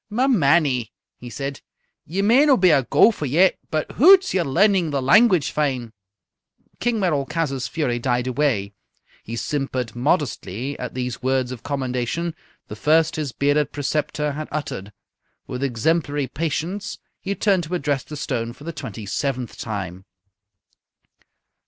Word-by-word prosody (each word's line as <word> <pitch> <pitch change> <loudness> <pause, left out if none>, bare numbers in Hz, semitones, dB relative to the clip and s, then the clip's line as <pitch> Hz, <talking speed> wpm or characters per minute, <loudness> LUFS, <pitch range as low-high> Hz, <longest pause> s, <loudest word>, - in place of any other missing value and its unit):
"Ma 245 +5 +1
mannie," 145 - +3 0.3
he 120 - -9
said, 140 +2 -5 0.5
"ye 190 +6 -1
may 235 +7 +5
no' 285 -4 +5
be 185 -2 +5
a 140 - +5
gowfer 150 - +3
yet, 175 +8 +3
but 155 -1 -2
hoots! 370 +6 +6
ye're 185 - +2
learning 180 +4 +3
the 140 -2 -1
language 180 - +4
fine!" 130 -6 -1 0.9
King 240 -2 0
Merolchazzar's 145 -5 -1
fury 130 -7 -1
died 125 0 0
away. 125 -7 0 0.5
He 115 - -7
simpered 130 -3 -3
modestly 130 - -1
at 125 - -6
these 125 -2 -3
words 130 -1 0
of 125 - -7
commendation, 135 +4 -2 0.3
the 105 - -7
first 155 +6 +2
his 150 -4 -3
bearded 145 +3 +1
preceptor 150 +1 -1
had 155 +2 -5
uttered. 125 -9 -4 0.5
With 125 - -6
exemplary 145 +3 0
patience 165 +7 -3 0.2
he 200 0 -3
turned 195 -5 +2
to 175 +4 -3
address 145 -5 -1
the 150 - -8
stone 115 -4 -3
for 135 - -15
the 170 +2 -5
twenty 115 -8 -7
seventh 130 +2 -3
time. 95 -4 -5
145 Hz, 145 wpm, -22 LUFS, 125-170 Hz, 0.9 s, hoots